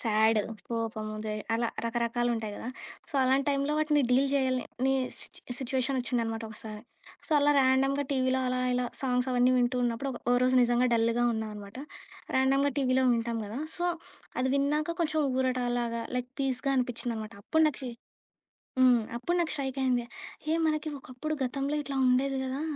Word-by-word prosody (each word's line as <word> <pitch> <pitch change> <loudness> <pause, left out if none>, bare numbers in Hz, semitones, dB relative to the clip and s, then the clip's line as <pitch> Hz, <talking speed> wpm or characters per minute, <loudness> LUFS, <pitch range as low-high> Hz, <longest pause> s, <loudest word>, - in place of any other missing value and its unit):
సాడు, 220 -1 +3 0.2
కోపము 225 -2 -3
దే 215 - -2 0.2
అలా 230 0 +1 0.2
రకరకాలుంటాయి 235 -1 -1
కదా. 230 - -6 0.4
సో, - - -16
అలాంటి 265 +2 +2
టైంలో 280 +1 +1
వాటిని 305 -1 +3
డీల్ 270 +2 +4
చేయాలని 260 -1 0 0.2
సిట్ - - -8 0.2
సిట్యుయేషనొచ్చిందనమాట 250 -3 -1
ఒకసారి. 215 -1 -8 0.4
సో, - - -6
అలా 290 0 +4
ర్యాండమ్‌గా 270 +1 +3
టీవీలో 260 0 +1
అలా 255 0 0
ఇలా 250 0 +1 0.2
సాంగ్సవన్నీ 250 -1 +2
వింటూ 250 +1 +1
ఉన్నప్పుడు, 240 +4 -1
ఒక - - -8
ఒకరోజు 255 +1 +3
నిజంగా 240 +1 +3
డల్‌గా 230 +1 +2
ఉన్నాననమాట. 215 0 -6 0.6
ర్యాండమ్‌గా 275 +2 +3
టీవీలో 260 -1 +2
వింటాం 230 0 -1
కదా, 215 +5 -5 0.2
సో 350 - 0 0.5
అది 260 - +1
విన్నాక 300 +4 +1
కొంచెం 315 -1 +1 0.2
ఊరట 255 -1 +1 0.2
లాగా, 235 -1 -2
లైక్ 250 0 -3
పీస్‌గా 270 0 0
అనిపించిందనమాట. 235 -3 -2
అప్పుడు 320 +5 +3
నాకీ 265 -4 -3 0.9
హ్మ్, 250 -2 +6 0.2
అప్పుడు 300 +9 -1
నాకు 335 -2 0
స్ట్రైక్ 275 -2 -3
అయింది, 250 -2 +2 0.5
ఏ - - +3
మనకి 310 0 0
ఒకప్పుడు 265 +4 -5
గతంలో 275 +3 -1
ఇట్లా 280 -1 -5
ఉండేది 265 +2 +2
గదా! 265 +2 -3
255 Hz, 150 wpm, -29 LUFS, 235-275 Hz, 0.9 s, హ్మ్